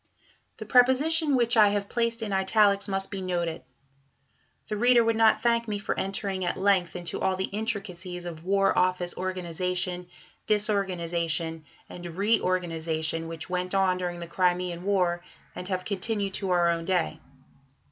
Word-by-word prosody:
The - - -7
preposition 280 +5 +4
which 240 -1 +2
I 215 -2 +7
have 200 0 -1
placed 230 0 -1
in 205 -2 -3
italics 200 +1 +3
must 195 -1 -2
be 195 -1 -4
noted. 175 -3 -2 1.1
The 215 - -3
reader 240 +2 +5
would 230 0 +1
not 220 -1 +4
thank 235 -1 +1
me 210 -1 -2
for 205 - -3
entering 195 -1 -2
at 175 - -1
length 190 -2 +1
into 175 -2 -4
all 190 0 +1
the 190 - -2
intricacies 195 -5 -4
of 165 -2 -7
War 195 +1 +2
Office 180 -1 +1
organization, 180 0 -1 0.4
disorganization, 170 -6 0 0.2
and 175 - -10
reorganization, 165 -4 -1
which 165 -1 -7
went 180 +1 -2
on 185 -1 +2
during 175 -1 -4
the 170 - -6
Crimean 180 0 0
War, 180 -3 +1 0.3
and 180 - -7
have 185 -1 -3
continued 200 0 -2
to 195 -1 -3
our 175 -1 +3
own 165 0 -3
day. 180 -3 0
185 Hz, 155 wpm, -27 LUFS, 175-205 Hz, 1.1 s, I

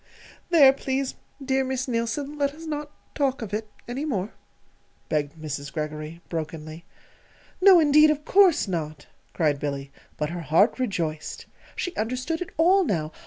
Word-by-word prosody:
_ - - -37 0.5
There, 290 -6 +7
please, 270 -1 -2 0.3
dear 265 0 +2
Miss 260 +1 -2
Neilson, 245 +5 -2
let 285 -1 -1
us 325 +1 -10
not 300 -1 -4 0.2
talk 270 -4 0
of 210 -2 -7
it 215 0 -3 0.2
any 250 +4 -4
more," 215 -9 -2 0.8
begged 150 -2 -1
Mrs. 145 -2 -5
Greggory, 155 +2 -5
brokenly. 160 0 -6 0.8
"No, 375 -2 +8
indeed, 305 0 +6
of 300 0 -1
course 375 - +5
not!" 155 -5 -4 0.3
cried 150 -4 +1
Billy; 140 -1 -4 0.3
but 150 +1 -2
her 175 0 -4
heart 170 - +3
rejoiced. 165 -10 -3 0.3
She 360 - -3
understood 255 +9 -2
it 360 - -4
all 370 +5 +5
now. 160 - -1
230 Hz, 155 wpm, -25 LUFS, -, 0.8 s, No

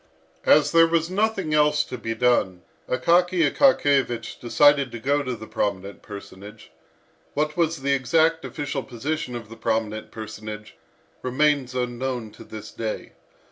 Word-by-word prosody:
As 145 -1 +5
there 165 0 +6
was 165 +1 0
nothing 200 -5 0
else 150 0 +3
to - - -7
be 115 -2 -4
done, 110 -7 +1 0.3
Akaky 170 +5 +3
Akakiyevich 140 - +2
decided 140 +2 +4
to 120 - -6
go 140 +5 +1
to 130 -3 -3
the 110 -1 -9
prominent 100 -2 -3
personage. 100 +1 -11 0.6
What 150 +1 0
was 165 -4 0
the 140 0 +2
exact 160 +4 +2
official 145 -2 -4
position 130 +1 -4
of 115 -2 -7
the 115 +1 -12
prominent 110 -1 -2
personage, 110 -2 -8 0.5
remains 130 0 +1
unknown 125 -2 -3
to - - -13
this 110 -1 -9
day. 110 -2 -5
130 Hz, 140 wpm, -24 LUFS, 110-150 Hz, 0.6 s, there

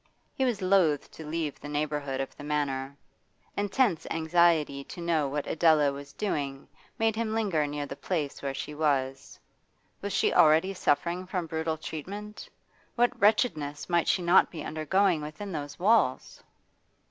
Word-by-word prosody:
He 265 - 0
was 225 -6 -1
loth 185 -6 +2
to 160 - -10
leave 155 -1 -3
the 145 - -8
neighbourhood 145 -2 -2
of 135 - -6
the - - -10
Manor; 140 -2 -2 0.6
intense 205 -2 +1
anxiety 160 -3 +2
to - - -10
know 165 -4 +1
what 145 +1 -3
Adela 155 -3 +3
was 140 0 -9
doing 140 -9 -3 0.3
made 225 -1 +1
him 220 -1 -2
linger 185 -10 +1
near 145 0 -4
the 140 - -7
place 150 -3 -3
where 135 -1 -3
she 135 +2 -5
was. 135 -3 -1 0.6
Was 200 - -4
she - - +2
already 160 +5 +5
suffering 175 +1 0
from 180 -2 -2
brutal 160 0 -2
treatment? 200 +8 -7 0.5
What 240 0 +1
wretchedness 155 - +1
might 170 -1 +2
she 185 - +2
not 175 +2 +5
be 165 - -7
undergoing 160 +3 +1
within 155 +7 -7
those 145 -3 -5
walls! 205 - +2
160 Hz, 155 wpm, -28 LUFS, 145-190 Hz, 0.6 s, already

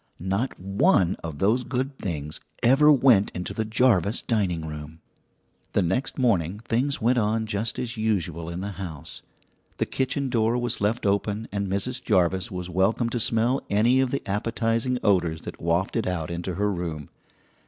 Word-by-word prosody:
Not 95 +9 -2
one 95 -1 +2
of 80 -3 -5
those 110 - +2
good 130 +2 -2
things 75 -5 -4 0.2
ever 135 +5 +6
went 125 -8 +5
into 90 - -4
the 110 - -1
Jarvis 110 -2 +2
dining 95 -9 0
room! 75 +1 -8 0.7
The - - +3
next 95 +11 -1
morning 100 - +1
things 125 +6 -1
went 120 +1 +2
on 110 +1 0
just 110 +1 -2
as 120 -1 -4
usual 85 -7 -1
in 85 +2 -5
the 100 +1 -4
house. 80 -6 -7 0.6
The - - 0
kitchen 135 +1 -1
door 115 -1 +1
was 120 -2 -2
left 105 +3 0
open 100 +2 0
and 100 0 -2
Mrs. 100 +7 -2
Jarvis 95 -2 +1
was 90 -1 -5
welcome 95 +6 +1
to 120 - -1
smell 115 +4 +2
any 115 +6 +3
of 130 -1 +2
the 140 - -2
appetizing 115 +4 0
odours 85 -5 +2
that - - -9
wafted 90 +7 0
out 85 -3 -2
into 85 +1 -4
her 105 +1 +1
room. 85 -5 -4
105 Hz, 165 wpm, -25 LUFS, 90-120 Hz, 0.7 s, ever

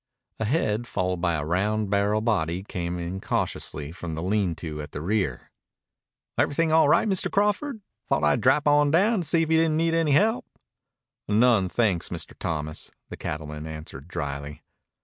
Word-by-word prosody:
A 110 - 0
head 120 -3 0
followed 90 -4 -1
by 85 -2 +1
a 75 -1 -2
round 100 +5 0
barrel 100 +1 +2
body 95 -6 0
came 90 -3 -4
in 90 +2 -4
cautiously 75 -5 -3
from 85 -2 -6
the 80 - -4
lean 95 -2 +1
to 75 -2 -6
at 75 0 -9
the - - -4
rear. 90 - -2 0.9
"Everything 160 +2 +2
all 160 -2 +5
right, - - +4
Mr. 190 -3 +2
Crawford? 210 +5 0 0.3
Thought 75 - +1
I'd 75 0 +3
drap 140 +4 +3
on 145 0 +5
down 195 +7 +3
to 165 - -4
see 165 -1 +3
if 160 - -3
you 160 - +5
didn't 160 -1 +2
need 165 0 +1
any 165 -3 +2
help." 220 - +2 0.8
"None, 105 -2 +4
thanks, 95 -2 +1
Mr. 85 -3 -6
Thomas," 75 -1 -3 0.2
the - - -6
cattleman 75 0 -5
answered 75 -2 -8
dryly. 70 -1 -5
100 Hz, 175 wpm, -26 LUFS, -, 0.9 s, all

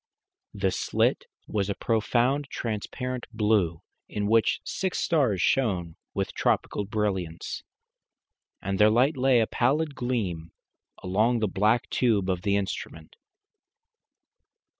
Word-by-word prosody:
The 95 -1 +1
slit - - +1 0.2
was 100 -2 -1
a 100 - -1
profound 120 +5 +1
transparent 125 +3 -4
blue, 105 -7 +1 0.3
in 105 -1 -2
which 110 +2 +3
six 190 -1 -2
stars 130 - +2
shone 90 -11 +1 0.2
with - - -2
tropical 105 - 0
brilliance, 95 -6 -2 1.0
and 95 -1 -2
their 105 0 +7
light 130 +7 +3
lay, 130 -2 +4
a - - +3
pallid 145 +7 +1
gleam, 100 - -3 0.5
along 110 +6 +2
the 110 -2 +1
black 105 +5 +2
tube 105 -6 +2
of 90 -1 -2
the 100 +1 +1
instrument. 95 -5 -4
110 Hz, 120 wpm, -27 LUFS, 95-125 Hz, 1.0 s, their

